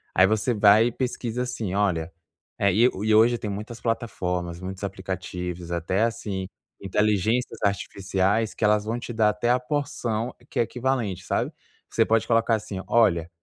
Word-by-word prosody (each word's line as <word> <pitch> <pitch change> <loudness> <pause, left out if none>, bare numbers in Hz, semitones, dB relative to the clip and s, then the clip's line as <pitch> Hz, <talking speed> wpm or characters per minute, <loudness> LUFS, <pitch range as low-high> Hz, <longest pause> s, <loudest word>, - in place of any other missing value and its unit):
aí 95 - +7
você 110 +3 +1
vai 105 +2 +6
e - - -1
pesquisa, 125 -1 -2
assim; 110 -6 -4
"Olha" 90 -6 0 0.5
e 105 +5 +4 0.3
hoje 120 +2 +5
tem 105 - -5
muitas 105 +4 -6
plataformas, 90 -7 -2
muitos 95 +1 -7
aplicativos, 90 -2 -5
até, 90 +5 0
assim, 105 -5 -2 0.3
inteligências 105 +4 +1
artificiais 100 +2 0
que 110 - -1
vão 105 +3 +1
te 120 - -7
dar 110 -1 +3
até 105 +3 -1
a 125 +1 +4
porção 125 -4 -2 0.2
equivalente, 115 -5 -1
sabe? - - -1 0.4
Você - - +3
pode 115 0 +2
colocar 115 0 +3
assim: 100 -3 -5
"Olha, 85 -8 +3
105 Hz, 145 wpm, -25 LUFS, 95-115 Hz, 0.5 s, aí